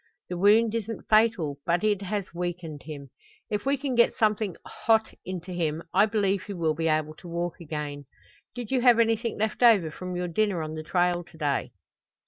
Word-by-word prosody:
The 180 - -3
wound 215 +3 +5
isn't 225 0 -4
fatal, 215 -10 +3
but 170 +2 +1
it 205 -2 +2
has 200 -2 -4
weakened 175 -4 -4
him. 140 -4 -8 0.4
If 210 +4 -2
we 280 +1 +2
can 270 -1 -3
get 235 -1 +4
something 215 -4 +1
hot 220 -1 +1
into 185 0 -6
him 165 -2 -2
I 200 +3 +5
believe 200 -3 +1
he 200 - -7
will 165 -4 0
be 165 +1 -1
able 155 -1 +1
to 180 - -12
walk 170 0 -3
again. 150 -3 -5 0.5
Did 245 -2 -6
you 260 -2 +2
have 245 -2 +6
anything 230 0 +1
left 220 +2 -2
over 210 -10 +5
from 180 +3 -6
your 180 0 -2
dinner 185 -1 0
on 155 0 -5
the 155 - -5
trail 175 +2 +1
to 170 -1 -18
day?" 145 -3 -1
185 Hz, 195 wpm, -27 LUFS, 165-220 Hz, 0.5 s, have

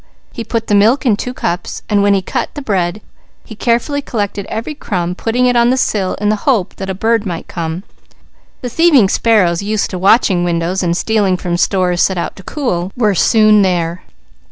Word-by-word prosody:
He 230 - -5
put 225 0 -3
the 210 - -1
milk 225 +8 +3
in 225 -5 +3
two 250 +4 -5
cups, 180 -7 -4
and 205 -2 +2
when 200 0 +3
he 190 - -1
cut - - -3
the 290 - -5
bread, 195 -3 -1 0.4
he - - -10
carefully 240 +6 0
collected 205 -6 -4
every 230 +7 -4
crumb, 180 -11 -3
putting 230 +6 0
it 245 0 +2
on 235 0 +4
the 260 - +2
sill 200 -7 0
in 210 0 -1
the 215 - +1
hope 220 -9 0
that 195 -1 -5
a 190 - -2
bird 225 +2 +1
might 175 -5 -5
come. 165 +1 -5 0.8
The 245 - -4
thieving 280 - +4
sparrows, 190 -8 +2
used 210 +1 -2
to 185 - -4
watching 190 -2 +3
windows 175 +2 -1
and 170 -1 0
stealing 205 -4 +1
from 175 -1 -3
stores 180 0 +1
set 190 - +1
out 170 - -3
to - - -10
cool, 185 - -3
were 215 -4 +2
soon 215 +2 +4
there. 175 -2 0
205 Hz, 205 wpm, -15 LUFS, 180-230 Hz, 0.8 s, on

